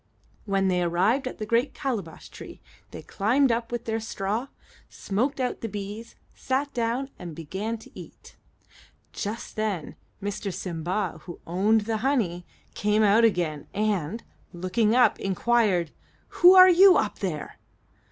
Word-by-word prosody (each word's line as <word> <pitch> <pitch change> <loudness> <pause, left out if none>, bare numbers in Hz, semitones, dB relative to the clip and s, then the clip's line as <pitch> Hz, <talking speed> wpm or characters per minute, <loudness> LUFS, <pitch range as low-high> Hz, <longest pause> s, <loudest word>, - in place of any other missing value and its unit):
When 195 -2 +1
they 180 -1 +1
arrived 190 +10 +1
at - - -6
the 215 - -4
great 235 +5 0
calabash 210 - -5
tree - - -11 0.3
they - - -10
climbed 245 +6 +1
up 230 0 -2
with 240 0 -4
their 225 0 -1
straw, 220 +2 -3 0.4
smoked 250 +9 -2
out 250 -1 -2
the 225 - -4
bees, 205 +3 -7 0.2
sat 275 +2 -2
down, 245 +3 -2
and 170 -3 -8
began 190 +9 -4
to 225 - -16
eat. - - -13 0.8
Just 215 +3 -5
then 205 -8 -3 0.2
Mr. 200 0 -4
Simba, 175 0 -3
who 175 - -9
owned 205 +6 +2
the 220 +1 -2
honey, 215 -9 -1 0.3
came 210 +1 +1
out 210 +3 +4
again, 170 -9 0
and, 210 -1 -1 0.3
looking 200 +6 0
up, 250 - +4
inquired, 195 -4 +1 0.4
"Who 360 +1 +6
are 370 0 +10
you, 370 +1 +7
up 210 - -1
there?" 170 -7 -5
215 Hz, 145 wpm, -26 LUFS, 185-235 Hz, 0.8 s, are